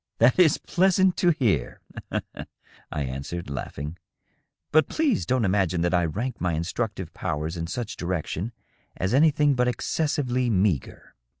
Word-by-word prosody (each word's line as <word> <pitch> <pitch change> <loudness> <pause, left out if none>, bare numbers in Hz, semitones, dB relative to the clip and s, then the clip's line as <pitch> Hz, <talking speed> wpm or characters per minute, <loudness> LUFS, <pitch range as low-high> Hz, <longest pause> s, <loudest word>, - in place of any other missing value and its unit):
"That 120 +8 +4
is 165 -5 +6
pleasant 190 0 +2
to 175 - +3
hear,'^ 130 - +1 1.1
I 75 - -2
answered, 70 +5 -5
laughing. 70 +4 -5 0.7
"But 155 +1 +4
please 290 - +1
don't 130 -3 +2
imagine 95 -3 +1
that 85 +1 +1
I 90 -1 +3
rank 115 +10 -3
my 90 -2 +1
instructive 95 +2 -3
powers 80 -2 -3
in 85 -1 -4
such 105 +1 -4
direction 90 +4 -3 0.5
as 95 +5 -1
anything 150 0 +4
but 125 -1 +1
excessively 130 -1 0
meagre.'' 95 - 0
105 Hz, 135 wpm, -25 LUFS, 85-135 Hz, 1.1 s, is